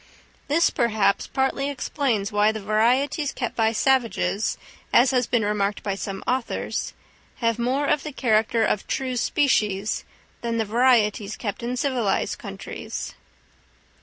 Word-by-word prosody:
This, 325 +4 +3
perhaps, 220 -5 +1
partly 270 +1 0
explains 250 -6 -1
why 210 +1 +3
the 220 - -5
varieties 250 +8 +1
kept 240 -4 -4
by 225 -1 +2
savages, 230 -3 +1 0.3
as 250 +3 +5
has 250 -2 +1
been 230 -4 +1
remarked 205 -1 -1
by 200 - -1
some 195 0 -5
authors, 255 -1 -2 0.4
have 230 -1 0
more 260 +4 +1
of 285 - +2
the 305 - -6
character 225 -3 +2
of 210 - -1
true 260 -1 -2
species 215 - +1 0.4
than 235 -1 -2
the 225 - +1
varieties 215 -3 +2
kept 205 0 -4
in 245 +2 -3
civilised 245 -7 0
countries. - - -6
235 Hz, 135 wpm, -24 LUFS, 210-260 Hz, 0.4 s, as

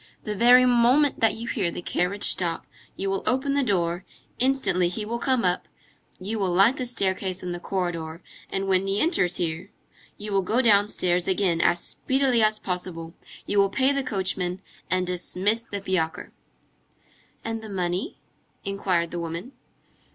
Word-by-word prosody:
The 210 -1 -3
very 245 +4 +6
moment 250 +4 +4
that 225 - +3
you 230 +1 -6
hear 200 -7 -1
the 175 - -7
carriage 190 +4 -1
stop, 170 -2 0 0.3
you 195 - -3
will 195 0 -1
open 265 +2 +2
the 285 - +2
door, 175 -7 0 0.4
instantly, 245 -9 +2
he 210 +5 -4
will 235 +2 -3
come 255 -5 +1
up, 180 0 0 0.5
you 210 +4 -4
will 190 -3 0
light 195 +9 +4
the 255 -3 -3
staircase 190 -5 -1
and 180 -1 -3
the 175 - -5
corridor, 175 -3 -3 0.3
and 195 0 -2
when 190 0 +2
he 195 +1 0
enters 195 - +2
here, 170 +2 -2 0.5
you 210 0 -6
will 195 - +3
go 220 +6 0
downstairs 200 -6 +2
again 185 -3 +1
as 175 - +3
speedily 265 -3 +1
as 215 0 +3
possible, 180 -4 -5 0.3
you 205 - +1
will 195 0 +4
pay 265 +6 +2
the 280 0 0
coachman, 190 -4 -2 0.3
and 185 0 +1
dismiss 190 +5 0
the 200 -3 -4
fiacre." 180 -4 -2 1.1
"And 225 0 -3
the 220 - -9
money?" 185 - -2 0.5
inquired 185 -4 -1
the 175 - -4
woman. 170 +8 -5
195 Hz, 165 wpm, -25 LUFS, 180-230 Hz, 1.1 s, very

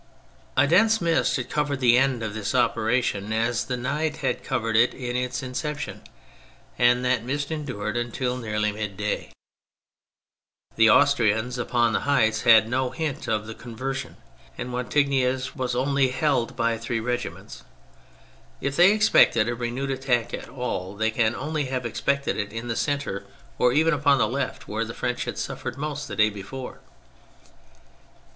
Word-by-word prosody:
A 130 - +6
dense 220 +8 +4
mist 170 -2 +1
had 130 - -4
covered 145 -2 0
the 120 -2 +5
end 130 -2 +2
of 110 -2 -3
this 110 +3 -3
operation 115 -3 +1
as 115 +2 0
the 125 +1 -3
night 150 +5 -2
had 125 - -1
covered 115 -4 -1
its 115 +3 +4 0.5
in 130 - -6
ception, 150 +2 -4 0.8
and 125 +1 +4
that 125 -2 +1
mist 140 +4 -3
endured 125 -9 -4
until 120 +1 -2
nearly 105 -3 -1
middaj^. 105 -1 -3 1.5
The 115 0 +5
Austrians 125 -3 +3
upon 120 -1 +1
the - - +2
heights 110 -6 +2
had 115 -3 +6
no 130 +2 0
hint 140 +3 -4
of 110 -1 0
the 110 - -7
conversion, 130 +4 -6 0.4
and 125 0 -5
Wattignies 130 0 0
was 125 -3 -2
only 135 +1 +2
held 130 -3 0
by 115 -2 0
three 115 0 -2
regiments. 120 +2 -5 1.0
If 140 0 -2
they 180 +5 +6
expected 215 - +4
a 120 - 0
renewed 125 +3 -3
attack 125 -3 0
at - - -6
all, 105 -7 -4
they 110 +2 0
can 110 0 +1
only 150 +1 -2
have 130 -1 -3
expected 140 +4 -1
it 105 -1 -3
in 115 +2 -6
the 115 - -1
centre, 145 -9 -2 0.4
or 125 - +4
even 160 +5 +3
upon 140 -1 +3
the 115 - +2
left 135 +5 -3
where 110 +2 -2
the 115 +1 -7
French 125 0 -2
had - - -5
suffered - - -5
most 150 0 -4
the - - -6
day 105 0 +4
before. 105 +6 -8
125 Hz, 160 wpm, -25 LUFS, 115-140 Hz, 1.5 s, A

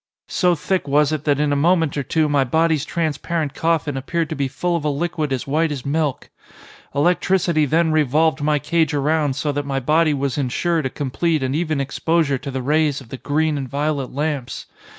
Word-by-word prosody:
So 180 -1 +2
thick 180 0 -1
was 145 +2 +3
it 155 -1 -3
that 145 -2 +2
in 150 -1 +1
a - - +1
moment 165 0 +2
or 145 - 0
two 155 +3 +1
my 145 -2 +2
body's 160 +3 +1
transparent 160 -2 -2
coffin 160 -3 0
appeared 160 +4 -2
to 155 - -3
be 140 -1 -1
full 175 +6 -2
of 165 - -2
a 150 - +1
liquid 155 0 -2
as 130 -2 -2
white 155 +3 +1
as 135 -4 -5
milk. 150 -1 -1 0.6
Electricity 170 0 +2
then 160 +3 +2
revolved 155 +1 +2
my 150 0 +2
cage 155 +1 0
around 145 -1 +1
so 150 +1 -1
that 145 0 -2
my 135 -1 -2
body 155 +3 +2
was 140 0 -2
insured 155 +3 0
a - - -5
complete 150 +3 -1
and 130 +1 -1
even 155 -2 -1
exposure 140 +1 0
to 140 - -6
the 130 -1 -4
rays 150 0 +1
of 130 -4 -14
the 130 - -6
green 150 +2 0
and 135 -2 -5
violet 145 -1 -2
lamps. 140 -3 -3
150 Hz, 205 wpm, -21 LUFS, 140-160 Hz, 0.6 s, was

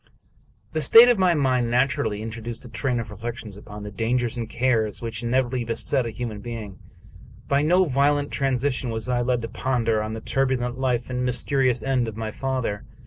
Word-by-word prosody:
The 160 - -1
state 230 - +8
of 240 -5 +3
my 180 -2 +4
mind 130 -4 +1
naturally 120 -4 0
introduced 115 +2 -6
a - - -10
train 125 +1 -1
of 110 -2 -6
re 105 - -9
flections 115 -2 -6
upon 105 0 -10
the 105 - -7
dangers 120 +3 -1
and 115 -2 -4
cares 115 -4 0
which 115 -1 -5
inevitably 125 +1 0
beset 115 +2 0
a - - -3
human 110 -2 -5
being. 110 -4 -7 0.7
By 140 0 +2
no 180 +5 +4
violent 145 0 +1
transition 135 -1 0
was 110 +1 -3
I 125 -1 +1
led 120 -1 0
to - - -2
ponder 115 -4 0
on 110 0 -4
the 110 - -6
turbulent 130 -2 -1
life 125 -2 -1
and 125 0 -1
mysterious 125 0 +1
end 130 -3 +1
of 110 -1 -6
my 110 -1 -3
father. 130 -5 -2
120 Hz, 195 wpm, -24 LUFS, 115-130 Hz, 0.7 s, state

